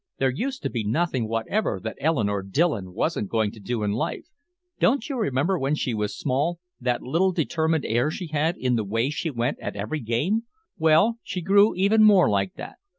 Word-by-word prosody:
There 135 -1 +2
used 265 - -4
to - - -1
be 115 -3 -2
nothing 125 +1 0
whatever 115 - -1
that 110 - -4
Eleanore 110 -10 +1
Dillon 100 - 0
wasn't 150 - -1
going 110 -3 0
to 110 - -13
do 110 +2 -3
in 105 - 0
life. 110 - -3 0.5
Don't 250 -1 +2
you 280 - -3
remember, 175 - 0
when 135 +3 0
she 130 -5 -2
was 105 -1 -2
small, 150 +7 -1 0.2
that 125 -1 -1
little 170 +8 +2
determined 160 -2 0
air 120 +6 +1
she 175 +3 -5
had 160 +2 0
in 125 -1 0
the 110 - 0
way 115 +7 -1
she 160 +2 -2
went 125 0 -2
at - - -5
every 110 +10 -3
game? 150 - 0 0.3
Well, 165 +7 +3
she 185 - -5
grew 200 +4 +4
even 200 +4 +3
more 205 -4 +6
like 95 -2 0
that. - - -9
145 Hz, 200 wpm, -25 LUFS, 115-175 Hz, 0.5 s, more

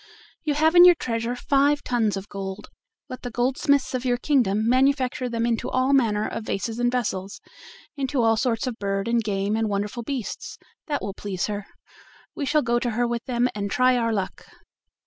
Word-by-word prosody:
You 300 -2 0
have 315 +2 +3
in 350 0 +9
your 355 -1 +9
treasure 230 -4 -2
five 285 +3 +2
tons 225 -5 0
of 195 +1 -7
gold; 195 0 -7 0.4
let 255 - -8
the 245 - -5
goldsmiths 260 +4 +1
of 255 -1 -2
your 245 -1 +1
kingdom 230 -6 +1
manufacture 260 +1 +2
them 230 0 -1
into 230 -2 -1
all 255 +2 +1
manner 215 -6 +2
of 225 - -5
vases 225 +3 -3
and 245 0 +2
vessels, 210 -2 -3 0.6
into 270 -3 -1
all 225 0 +4
sorts 230 0 0
of 245 -2 -4
birds 195 +2 -1
and 235 -1 +2
game 200 0 -1
and 220 -1 0
wonderful 205 +4 -2
beasts; 250 -2 -5 0.3
that 290 -2 -2
will 200 - -4
please 195 -2 -3
her. 205 -1 -5 0.7
We 285 -4 -4
shall 300 +2 +2
go 240 0 +1
to 240 - -1
her 240 +2 0
with 235 -1 -3
them 245 -1 +1
and 200 -1 -3
try 255 +3 +3
our 230 -2 +1
luck." 195 -4 -3
240 Hz, 195 wpm, -24 LUFS, 210-260 Hz, 0.7 s, in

